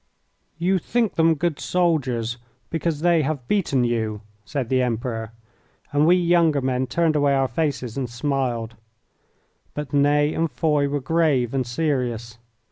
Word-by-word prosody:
"You 185 +3 +1
think 230 +4 0
them 165 0 +3
good 160 0 -1
soldiers 130 -10 0 0.3
because 165 -2 -1
they 170 -1 +4
have 140 -4 -3
beaten 160 -11 +1
you," 110 -3 -1 0.2
said 140 -3 -3
the 130 -1 +2
Emperor, 115 -2 -2 0.6
and 145 +2 +3
we 175 - +6
younger 170 -4 +3
men 130 -1 -1
turned 165 0 +1
away 145 -1 +3
our 135 -1 +2
faces 130 -3 -2
and 130 -3 -2
smiled. 120 -3 -2 1.0
But 150 0 -5
Ney 145 +1 +3
and 165 0 0
Foy 150 -2 +1
were 145 0 -2
grave 140 -4 +1
and 130 -2 -1
serious. 120 -5 -2
140 Hz, 145 wpm, -23 LUFS, 125-160 Hz, 1.0 s, we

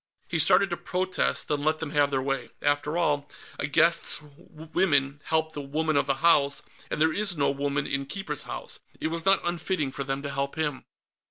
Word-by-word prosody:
He 165 - -1
started 195 +5 +5
to 175 - -1
protest, 185 +2 -1
then 145 -1 -1
let 155 +1 +2
them 155 -2 -5
have 145 -2 +3
their 135 -2 0
way. 135 -2 -2
After 145 +2 +1
all, 145 -4 +1 0.3
a - - -1
guest's - - +2 0.3
women 155 -3 0
helped 160 0 +1
the 145 - -4
woman 155 +3 -1
of 140 - +2
the 135 - +2
house, 140 -4 +4 0.3
and - - -4
as - - -2
there 160 - +5
was 195 +1 0
no 140 - +3
woman 140 0 -1
in 140 0 -2
Keeper's 195 +6 -4
House, - - -5 0.2
it 155 - -1
was 165 0 -3
not 195 0 +4
unfitting 175 -4 -1
for 140 - -4
them 135 +1 -3
to 140 - -3
help 140 0 -2
him. 150 -4 -2
150 Hz, 205 wpm, -27 LUFS, 140-165 Hz, 0.3 s, started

